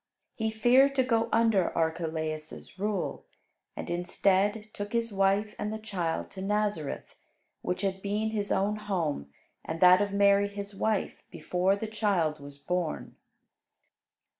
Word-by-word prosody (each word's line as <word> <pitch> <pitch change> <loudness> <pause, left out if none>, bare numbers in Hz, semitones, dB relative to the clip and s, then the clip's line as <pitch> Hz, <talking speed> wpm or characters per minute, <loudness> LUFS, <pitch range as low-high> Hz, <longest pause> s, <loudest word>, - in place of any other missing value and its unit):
He 220 -1 -1
feared 250 +5 +4
to 260 - +4
go 230 -3 +1
under 225 -5 +3
Archelaus' 160 0 -3
rule, 205 -2 -2 0.5
and - - -6
instead 195 +4 +1
took 205 +1 -6
his 230 -2 0
wife 195 +2 +2
and 210 - -2
the 220 - -3
child 185 -7 -3
to 190 - -8
Nazareth, 205 -6 -2 0.5
which 180 +2 -2
had 190 -1 -1
been 210 +2 -1
his 205 -2 -2
own 205 +2 +1
home 170 - -2 0.3
and 160 +1 -5
that 180 +2 +7
of 205 -1 0
Mary 200 0 +4
his 200 0 -6
wife 210 +1 -1
before 185 +2 0
the 205 - -4
child 200 -8 0
was 140 0 -10
born. 175 +3 -3
200 Hz, 140 wpm, -29 LUFS, 180-215 Hz, 0.5 s, that